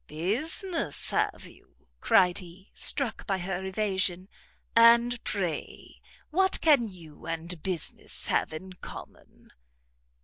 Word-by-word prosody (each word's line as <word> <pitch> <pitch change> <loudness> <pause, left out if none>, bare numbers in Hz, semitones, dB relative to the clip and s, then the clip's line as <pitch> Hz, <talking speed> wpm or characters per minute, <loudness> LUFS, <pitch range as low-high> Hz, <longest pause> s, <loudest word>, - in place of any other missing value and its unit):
"Business, 235 - -3
have - - -1
you?" - - -19
cried 180 - +4
he, 185 +2 -14
struck 260 -6 +2
by 195 - 0
her 185 0 -4
evasion; 190 -2 -1 0.5
"and 235 +1 +5
pray 180 -6 -4 0.3
what 380 +4 +2
can 285 -8 +4
you 165 -6 -13
and 165 0 -5
business 180 -3 +1
have - - 0
in 185 +4 -8
common?" 180 - -12
190 Hz, 110 wpm, -28 LUFS, 175-235 Hz, 0.5 s, and